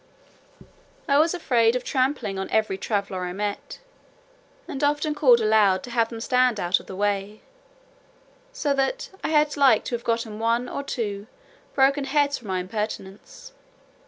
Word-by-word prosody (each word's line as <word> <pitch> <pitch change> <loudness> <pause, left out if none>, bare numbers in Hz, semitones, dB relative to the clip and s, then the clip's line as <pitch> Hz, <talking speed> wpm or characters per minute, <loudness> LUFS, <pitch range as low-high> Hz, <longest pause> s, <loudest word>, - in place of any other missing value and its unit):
I 280 -1 +4
was 325 +3 +3
afraid 240 -8 +2
of 250 - -2
trampling 255 -8 -1
on 190 - -4
every 215 -3 +1
traveller 195 -2 -3
I 180 0 -4
met, 205 +1 -4 0.9
and 275 - -5
often 295 +1 +1
called 260 -5 +5
aloud 215 -4 +3
to 245 - -8
have 230 -1 +1
them 230 - -7
stand 250 -1 +2
out 175 +1 +1
of - - -16
the 190 - -7
way, 205 +1 -2 1.1
so 400 - -1
that 275 - -1
I - - -1
had 300 -1 +2
like 265 -6 +4
to - - -5
have 235 - -7
gotten 230 -2 -2
one 230 +2 0
or 280 - -4
two 215 -7 -4 0.5
broken 275 +1 +3
heads 285 0 +1
for 235 - -13
my 185 -1 -1
impertinence. 210 - -6
230 Hz, 160 wpm, -24 LUFS, 205-280 Hz, 1.1 s, called